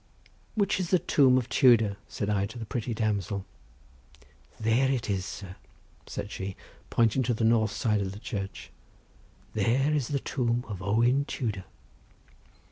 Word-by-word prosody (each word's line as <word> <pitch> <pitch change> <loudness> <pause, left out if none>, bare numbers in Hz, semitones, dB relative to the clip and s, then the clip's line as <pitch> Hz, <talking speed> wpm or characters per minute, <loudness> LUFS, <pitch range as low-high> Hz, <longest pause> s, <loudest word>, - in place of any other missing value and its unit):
"Which 200 -3 +1
is 180 -3 -2
the 185 - +5
tomb 135 -6 +4
of 125 -2 0
Tudor?" 115 -7 +5
said 100 - -3
I 100 -1 +1
to 110 +4 -10
the 115 - -5
pretty 115 +3 -3
damsel. 100 -3 -1 1.1
"There 115 +4 +3
it 120 -5 -1
is, 95 -1 -1
sir," 95 -2 -8 0.5
said - - -5
she, 95 0 -5 0.3
pointing 115 +2 +3
to 120 -1 +1
the 115 - -2
north 110 -1 +4
side 105 0 0
of 95 -1 -2
the 100 - -8
church; 100 -3 -6 0.8
"there 125 +8 +2
is 145 -5 0
the 145 - 0
tomb 120 -2 -1
of 100 -4 -6
Owen 120 +8 +2
Tudor." 110 -10 -3
115 Hz, 155 wpm, -28 LUFS, 100-130 Hz, 1.1 s, the